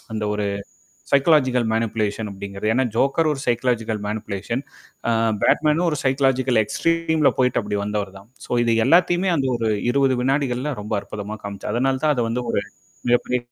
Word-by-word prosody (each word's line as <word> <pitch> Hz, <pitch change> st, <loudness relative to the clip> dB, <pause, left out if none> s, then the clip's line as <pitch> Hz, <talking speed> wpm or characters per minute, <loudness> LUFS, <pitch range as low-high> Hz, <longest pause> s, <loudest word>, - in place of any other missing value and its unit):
அந்த 110 Hz, -1 st, -2 dB
ஒரு 105 Hz, -, -2 dB, 0.7 s
சைக்காலாஜிகல் 135 Hz, -4 st, +3 dB
மேனிப்லேஷன் 110 Hz, -1 st, -1 dB
அப்படிங்கிறது. 100 Hz, +1 st, -5 dB
ஏன்னா, 130 Hz, +2 st, +2 dB
ஜோக்கர் 140 Hz, +5 st, +2 dB
ஒரு 135 Hz, -, -5 dB
சைக்காலஜிகல் 115 Hz, -3 st, 0 dB
மேனிபுலேஷன். 105 Hz, +3 st, -3 dB, 0.5 s
அ -, -, +3 dB, 0.3 s
பேட்மேனும் 155 Hz, +3 st, +3 dB
ஒரு 150 Hz, -, -2 dB
சைக்காலாஜிகல் 130 Hz, -3 st, +2 dB
எக்ஸ்ட்ரீம்ல 160 Hz, +3 st, +1 dB
போயிட்டு 125 Hz, -1 st, +2 dB
அப்டி 105 Hz, 0 st, -2 dB
வந்தவர் 105 Hz, -2 st, -3 dB
தான். 100 Hz, +3 st, -17 dB, 0.2 s
ஸோ -, -, -23 dB
இது 115 Hz, -1 st, +2 dB
எல்லாத்தையுமே 175 Hz, +2 st, +3 dB
அந்த 135 Hz, -3 st, 0 dB
ஒரு 115 Hz, -1 st, -1 dB, 0.2 s
20 135 Hz, -1 st, +2 dB
வினாடிகள்ல 135 Hz, +1 st, 0 dB
ரொம்ப 105 Hz, -, -6 dB
அற்புதமா 105 Hz, +1 st, -7 dB
காமிச்சார். 100 Hz, 0 st, -5 dB
அதனால 130 Hz, +2 st, +1 dB
தான் 150 Hz, -1 st, +4 dB
அத 120 Hz, -, +1 dB
வந்து 125 Hz, +2 st, -1 dB
ஒரு 100 Hz, -, +1 dB, 0.5 s
மிகப்பெரிய 120 Hz, +1 st, +2 dB
125 Hz, 155 wpm, -22 LUFS, 110-140 Hz, 0.7 s, தான்